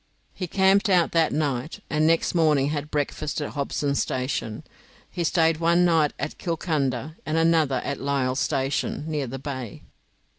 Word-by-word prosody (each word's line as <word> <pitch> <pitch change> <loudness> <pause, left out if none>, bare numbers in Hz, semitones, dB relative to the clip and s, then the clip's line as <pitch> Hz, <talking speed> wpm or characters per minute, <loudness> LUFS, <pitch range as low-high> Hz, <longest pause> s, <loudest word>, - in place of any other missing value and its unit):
He 180 - -4
camped 195 +4 +3
out 180 -3 +3
that 165 -1 +2
night, 145 -1 -2
and 155 0 +1
next 165 0 +2
morning 150 -5 +3
had 150 0 -3
breakfast 150 +1 -2
at 145 - -4
Hobson's 140 0 -1
Station. 125 -4 -3 0.5
He 175 - -2
stayed 165 -1 +2
one 170 +2 +3
night 160 -4 +3
at 145 - -5
Kilcunda, 155 -4 -2
and 155 +1 -1
another 160 -6 +3
at 140 - -3
Lyle's 135 -1 0
station, 135 +2 -1
near 150 -4 -2
the 130 +3 -5
bay. 130 -5 -6
150 Hz, 155 wpm, -25 LUFS, 135-165 Hz, 0.5 s, camped